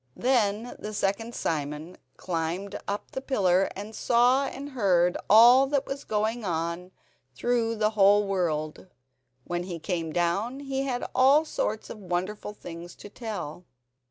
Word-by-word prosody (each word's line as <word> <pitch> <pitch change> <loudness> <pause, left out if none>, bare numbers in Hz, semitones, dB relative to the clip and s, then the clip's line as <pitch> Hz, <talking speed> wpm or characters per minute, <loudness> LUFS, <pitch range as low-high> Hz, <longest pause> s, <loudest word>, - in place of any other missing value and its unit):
Then 235 -2 +1
the 210 0 -6
second 225 +5 -1
Simon 150 +2 -3 0.2
climbed 180 +3 -3
up 200 +1 -4
the 265 - -4
pillar 195 -9 +2
and 205 +3 -7
saw 245 +5 +3
and 280 +2 -7
heard 180 -8 +2
all 240 +6 +8
that 280 0 0
was 275 +1 -6
going 220 +2 -1
on 170 0 -3 0.5
through 230 - 0
the 215 0 +1
whole 205 0 +5
world. 165 -4 -2 0.6
When 175 0 -3
he 175 -1 -5
came 165 -1 -3
down 195 - -1
he 270 -1 -2
had 250 -2 -2
all 275 +5 +5
sorts 220 -7 -3
of 215 - -9
wonderful 190 +3 -3
things 170 -2 -9
to 205 - -11
tell. 200 -8 -6
205 Hz, 145 wpm, -27 LUFS, 175-240 Hz, 0.6 s, all